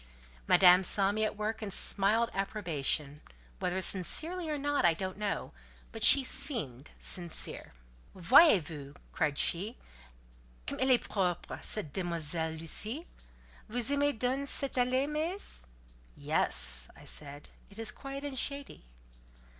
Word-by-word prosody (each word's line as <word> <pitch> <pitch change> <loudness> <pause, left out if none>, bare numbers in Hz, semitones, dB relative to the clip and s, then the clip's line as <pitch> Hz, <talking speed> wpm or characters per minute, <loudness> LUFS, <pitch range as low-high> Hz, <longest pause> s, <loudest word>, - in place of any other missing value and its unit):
Madame 180 0 +7
saw 195 +1 +3
me 215 +1 -1
at 215 - -2
work 220 +1 -3
and 210 -2 -5
smiled 215 +5 +1
approbation: 155 -7 -2 0.4
whether 180 +1 -2
sincerely 315 - +1
or 300 - -2
not 290 0 -1
I 170 -2 +4
don't 185 +2 -5
know; 205 0 -4 0.4
but - - -5
she 275 0 +9
seemed 220 - -4
sincere. 175 - -3 0.4
"Voyez 205 - +6
vous," 145 -2 -10 0.2
cried 150 -3 -1
she, 200 +8 0 0.9
"comme - - -5
elle 260 - +1
est 250 -2 +3
propre, 180 -4 -2
cette 155 -10 -2
demoiselle 165 -2 -3
Lucie? 210 - -3 0.6
Vous 245 +3 -1
aimez 285 0 +1
donc 260 +4 -2
cette 275 -1 0
allée, 255 +2 +1
meess?" 315 - -4 0.5
"Yes," - - +2
I - - -16
said, 145 0 -4 0.2
"it 200 - -14
is 225 -1 0
quiet 275 0 -8
and 275 -3 -3
shady." 280 - -2
205 Hz, 135 wpm, -31 LUFS, 165-270 Hz, 0.9 s, she